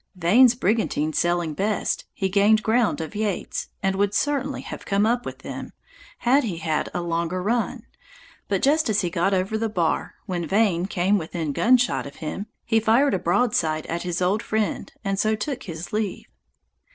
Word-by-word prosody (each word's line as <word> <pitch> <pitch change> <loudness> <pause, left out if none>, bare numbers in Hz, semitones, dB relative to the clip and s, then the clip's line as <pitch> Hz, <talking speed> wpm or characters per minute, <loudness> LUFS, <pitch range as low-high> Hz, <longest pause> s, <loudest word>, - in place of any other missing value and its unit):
Vane's 225 +8 +5
brigantine 195 -9 0
sailing 175 -1 +1
best, 205 +6 -1
he 195 - -1
gained 205 +3 +4
ground 225 -3 +2
of 160 - -6
Yeates, 210 -2 -3
and 195 0 +1
would 205 0 +1
certainly 285 0 0
have - - -8
come 200 +1 +1
up 240 +2 0
with - - -8
them, - - -7 0.4
had 270 +4 +3
he 195 -8 -3
had 160 -2 -1
a - - -5
little 175 -1 -3
longer 170 +2 -1
run; 230 +4 -1 0.6
but - - -1
just 300 -1 +3
as 210 -1 +2
he 175 -3 -2
got 175 +4 +1
over 195 +3 0
the 225 0 -1
bar, 175 -6 -1
when 175 -3 -3
Vane 190 -4 +2
came 195 +1 +1
within 160 -2 -4
gun 250 - +5
shot 245 -10 0
of 140 - -11
him, 180 +6 -5 0.2
he 225 - +3
fired 230 +5 +3
a 190 - +1
broadside 175 -5 +1
at 170 +1 -3
his 180 0 -2
old 195 +4 +1
friend, 220 -2 -2
and 195 -1 -1
so 215 +1 +2
took 260 +5 -4
his 170 -1 -7
leave. 210 -2 -2
200 Hz, 190 wpm, -24 LUFS, 175-225 Hz, 0.6 s, Vane's